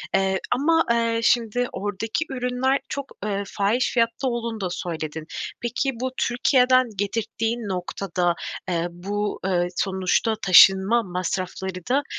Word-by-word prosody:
Eee, 190 0 +2 0.2
ama, 325 +5 +3
eee, 230 -1 +1
şimdi 240 +1 +2
oradaki 205 +9 -3
ürünler 255 +1 0
çok, 280 -1 -5
eee, 200 -1 -1
fahiş 215 +6 0
fiyatta 235 +2 +1
olduğunu 235 -3 -3
da 185 - -1
söyledin. 160 -3 -5 0.4
Peki, 245 +3 -1
bu 260 0 -1
Türkiye'den 255 +1 +3
getirttiğin 225 +3 -2
noktada, 180 -1 -1 0.3
eee, 170 -1 0
bu, 205 +4 -3
eee, 175 -2 +1
sonuçta 190 +4 +1
taşınma 190 +5 +6
masrafları 185 0 -4
da, 275 +3 +2
210 Hz, 125 wpm, -24 LUFS, 190-245 Hz, 0.4 s, taşınma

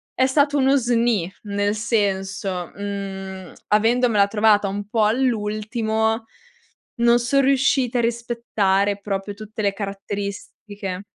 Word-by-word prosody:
è 260 - +3
stato 285 +2 +2
uno 270 0 +4
sni 235 -7 +1
nel 205 0 -1
senso: 195 -4 -1
mhmm, 195 -2 -6
avendomela 225 -1 +3
trovata 210 -1 +3
un 200 +1 -5
po' 220 0 +2
all'ultimo 220 -1 0 0.7
non 235 0 +4
son 250 +4 +2
riusciti 270 -2 +2
a - - +3
rispettare 225 -4 0
proprio 200 0 -4
tutte 215 +1 -7
le 200 -1 +2
caratteristiche. 200 -1 -6
215 Hz, 115 wpm, -22 LUFS, 200-235 Hz, 0.7 s, uno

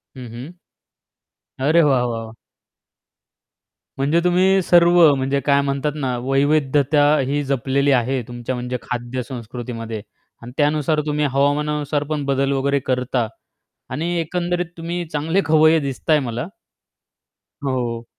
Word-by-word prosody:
हं, 125 -2 -8
हं. 140 +10 -9 1.0
अरे 155 +6 +4
वाह, 135 -4 +3
वाह, 115 -2 -3
वाह! 110 - -11 1.7
म्हणजे 145 +5 +2
तुम्ही 185 +2 +3
सर्व 175 0 +4 0.2
म्हणजे 135 +1 0
काय 140 -1 +4
म्हणतात 140 +1 -1
ना, 130 -4 -2
वैविध्यता 145 +1 +2 0.2
ही 145 +1 -1
जपलेली 140 +1 0
आहे. 130 0 +1
तुमच्या 120 +1 -5
म्हणजे 125 +1 -3
खाद्यसंस्कृतीमध्ये. 120 -2 -5 0.4
आणि 120 +1 -9
त्यानुसार 150 +1 +1
तुम्ही 150 0 0
हवामानानुसार 145 +1 0
पण 150 -2 -2
बदल 135 0 +1
वगैरे 140 +1 +1
करता. 125 -2 0 0.6
आणि 160 +7 -3
एकंदरीत 175 +2 -1
तुम्ही 170 +1 -4
चांगले 160 +6 +1
खवय्ये 155 +1 +5
दिसताय 145 +2 0
मला. 120 +1 -4 1.2
हो, 120 -3 -2
140 Hz, 120 wpm, -20 LUFS, 125-155 Hz, 1.7 s, खवय्ये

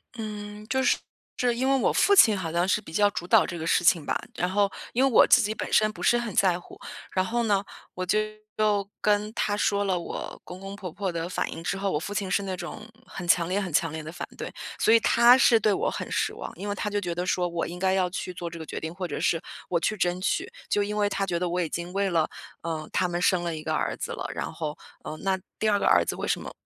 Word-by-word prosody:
嗯， 210 -1 -7
就 265 +1 +1
是 - - +4 0.4
是 245 -1 +2
因 260 +2 0
为 270 - +4
我 - - +2
父 405 - +4
亲 220 - +7
好 165 -3 -3
像 175 +2 +1
是 210 +2 +2
比 180 - -12
较 205 +1 +4
主 175 - -5
导 - - +5
这 175 - -5
个 160 - -4
事 175 - +3
情 165 -3 +4
吧， - - 0 0.2
然 180 - 0
后 200 +1 +2 0.2
因 255 +3 +3
为 - - +4
我 - - +7
自 - - +7
己 215 +1 -1
本 - - -5
身 215 0 +4
不 - - -11
是 240 - +4
很 235 -5 -3
在 180 -2 +3
乎， - - -14 0.3
然 185 - +1
后 235 +3 0
呢， 200 -3 +2 0.3
我 185 - -4
就 210 +4 +2 0.4
又 205 -2 +1
跟 210 0 +2
他 205 -1 0
说 205 -1 +1
了 185 -3 0
我 - - -6
公 180 +1 -9
公 195 +1 -7
婆 185 -4 -7
婆 190 +1 -3
的 170 0 -3
反 - - -2
应 165 - -7
之 195 - -1
后， 195 0 -1
我 150 - 0
父 200 - -6
亲 200 -2 -2
是 200 - +2
那 190 -2 -4
种 195 +5 -7 0.2
很 175 -2 -7
强 170 -1 +4
烈 195 +3 0
很 185 -3 -4
强 165 +1 +2
烈 160 0 -5
地 155 +1 -8
反 - - -6
对， - - -6 0.3
所 - - +4
以 230 - +7
他 235 +3 +6
是 235 -3 +5
对 215 0 +2
我 - - 0
很 - - -5
失 - - 0
望。 - - -7
因 205 - -6
为 205 - -1
他 210 +1 -3
就 205 0 0
觉 175 -3 -3
得 175 +1 -2
说 180 -1 0
我 170 -2 -2
应 175 +1 -7
该 190 +1 +1
要 185 -2 +2
去 180 0 -5
做 170 -1 -5
这 170 - -9
个 160 - -7
决 - - -5
定， 160 - -5
或 185 -1 -3
者 - - -4
是 165 - +2 0.3
我 170 - +2
去 215 - 0
争 180 -2 0
取， 190 - -1 0.2
就 205 - +2
因 210 +1 -2
为 205 -1 +3
他 200 -1 -1
觉 180 -3 -1
得 180 - -1
我 180 +1 0
已 165 - -2
经 170 +3 -5
为 200 0 +1
了， 165 -3 +2 0.4
呃， 160 -2 -4
他 185 - +1
们 175 0 -2
生 180 -2 +3
了 170 -2 -2
一 155 - -6
个 - - -1
儿 - - -1
子 - - -5
了。 - - -5
然 - - -4
后， 155 -2 -4 0.3
呃， 155 - -5
那 190 -1 +1 0.2
第 215 - +2
二 205 - +3
个 - - -1
儿 85 - +5
子 - - -3
为 - - -4
什 - - 0
么 - - -7
190 Hz, 305 characters per minute, -26 LUFS, 175-210 Hz, 0.4 s, 亲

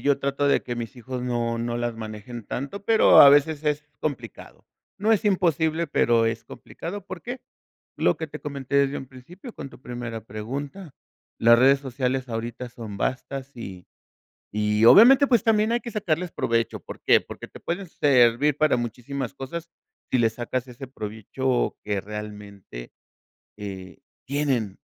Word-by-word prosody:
Yo 140 -1 +3
trato 140 +1 -1
de 140 - +3
que 120 -1 -5
mis 120 +1 -5
hijos 125 +1 -6
no, 120 -2 -1
no 120 0 -2
las 120 -1 -2
manejen 110 +1 -8
tanto, 140 - -5
pero 225 -1 +7
a 140 - +11
veces 145 +2 +4
es 150 0 0 0.2
complicado. 125 -8 -6 0.3
No 215 +3 +3
es 220 0 +1
imposible, 170 -4 +1
pero 115 -5 +3
es 115 0 -2
complicado, 195 +3 -8
¿por 185 -4 -8
qué? 245 +1 -6 0.6
Lo - - +2
que 160 - -4
te - - -9
comenté 140 -1 -3
desde 140 0 +2
un 135 - -8
principio 175 - -12
con 140 -3 -7
tu 120 - -15
primera 120 -3 -6
pregunta. 135 - -6 0.4
Las 115 +1 +6
redes 135 +2 +5
sociales 130 -1 -2
ahorita 120 +2 -5
son 115 -4 -8
vastas, 135 +4 -3
y, 95 -6 -8 0.7
y 105 +1 +2
obviamente, 255 - +8
pues, 240 -5 +3
también 220 0 +3
hay 240 - +2
que 235 - -7
sacarles 180 -4 -1
provecho, 115 -1 -1
¿por - - -10
qué? - - +5
Porque - - -10
te - - -13
pueden 175 +2 -4
servir 135 0 +3
para 155 -5 +3
muchísimas 125 +3 -4
cosas, 165 +5 -7 0.4
si 130 - +3
le 115 -1 +4
sacas 120 +2 -4
ese 125 +2 -9
provecho 120 +2 -2
que 105 -2 -1
realmente, 105 - -9 0.7
eh, 95 -3 -8 0.3
tienen. 130 -8 -1
130 Hz, 165 wpm, -25 LUFS, 115-150 Hz, 0.7 s, a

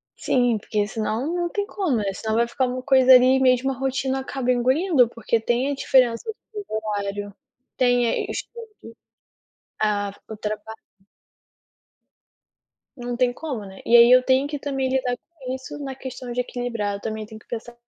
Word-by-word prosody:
Sim, 245 -3 +1
porque 205 0 -2
senão 220 +5 -2
não 345 -1 -1
tem 405 +2 -2
como, 365 - -1
né. 200 -2 -1
Senão 220 +2 -3
vai 235 +1 +2
ficar 255 +2 0
uma 255 +1 -4
coisa, 260 -1 +6
ali, 255 +1 +6
mesmo 260 +1 +3
a - - -2
rotina 265 0 -1
acaba 265 -1 -2
engolindo, 260 +2 +3
porque 230 0 -1
tem 240 +5 0
a - - -2
diferença 250 -4 +3
do 435 - -3 0.2
fuso 415 -2 -6
horário, 205 -2 -3 0.4
tem 245 -2 +3
aí - - 0
a - - -4
questão 470 -1 -6 0.2
de 230 0 -11 0.9
ah, 205 -2 0 0.2
o 220 - -7
trabalho. 215 +1 -5 2.2
Não 245 -1 -5
tem 250 -1 +2
como, 260 -9 -5
né. 190 0 -12
E 235 - +4
aí, 235 +1 +8
eu 255 0 +7
tenho 265 +2 +2
que 290 0 -4
também 270 -2 -2
lidar 255 -2 0
com 275 -7 -9
isso, 260 +2 -7
na 270 -2 -5
questão 255 -2 -7
de 250 +1 0
equilibrar, 235 -5 -3
eu 200 - -9
também 220 -1 -4
tenho 215 0 -11
que - - -25
pensar 235 0 -7
245 Hz, 185 wpm, -23 LUFS, 220-265 Hz, 2.2 s, aí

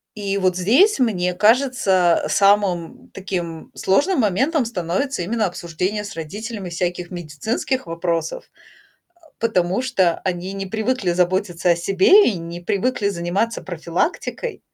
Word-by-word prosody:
и 200 -1 -2
вот 185 -2 +1
здесь, 265 - +4
мне 180 -8 +1
кажется, 210 -5 +3
самым 195 -3 +1
таким 175 -4 -5
сложным 290 - +2
моментом 260 - +1
становится 195 +3 -2
именно 215 +4 0
обсуждение 180 +4 -3
с 200 - -7
родителями 200 +5 -6
всяких 175 0 -3
медицинских 180 - -3
вопросов, 165 -1 -3 0.8
а, 330 - -22
потому 190 -2 +1
что 190 -10 +1
они 185 0 -3
не 195 0 -5
привыкли 220 -1 -1
заботиться 180 -1 +1
о 170 - +4
себе 195 - +5
и - - -3
не 170 +1 -7
привыкли 205 +3 0
заниматься 195 +5 -2
профилактикой. 180 - -3
190 Hz, 125 wpm, -21 LUFS, 175-225 Hz, 0.8 s, себе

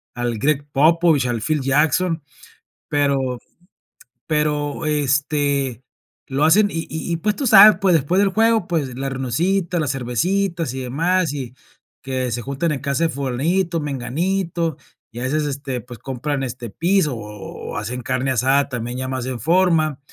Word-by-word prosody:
al 120 -2 -2
Greg 145 +1 +1
Popovich, 160 -1 +3
al 120 -2 -2
Phil 155 0 0
Jackson, 155 +4 +1 0.7
pero 135 -4 0 0.9
pero, 150 -1 -1
este, 140 -3 0 0.4
lo 135 +2 -1
hacen. 205 +6 +5
Y 165 - -4
y 160 +2 -4
y 165 - 0
pues 210 +5 -1
tú 275 - -3
sabes, 210 -2 +9
pues, 190 -3 +3
después 160 +5 +1
del 200 -1 +4
juego, 225 -1 +2
pues, 145 -8 -2
la 135 +1 -3
reunioncita, 170 +8 -1
las 145 -5 0
cervecitas, 165 - -1
y 135 - -5
demás, 165 +5 0
y 130 -4 -5 0.5
que 130 -2 -2
se 120 - -2
juntan 140 +6 -2
en 140 - -2
casa 140 +2 -1
de - - +1
fulanito, 160 +7 -1
menganito, 165 +5 -2 0.3
y 120 - -8
a 125 - -4
veces, 150 +4 0
este, 135 -3 -4
pues, 120 -2 -11
compran 135 +2 -3
este 125 -2 -5
piso, 170 - +1
o 105 -3 -8
o - - -4
hacen 120 +4 -4
carne 130 +2 -1
asada, 135 +3 +2
también 120 -1 -4
ya 130 0 -3
más 130 -1 -3
en 125 -2 -4
forma. 165 - +2
145 Hz, 165 wpm, -21 LUFS, 130-165 Hz, 0.9 s, sabes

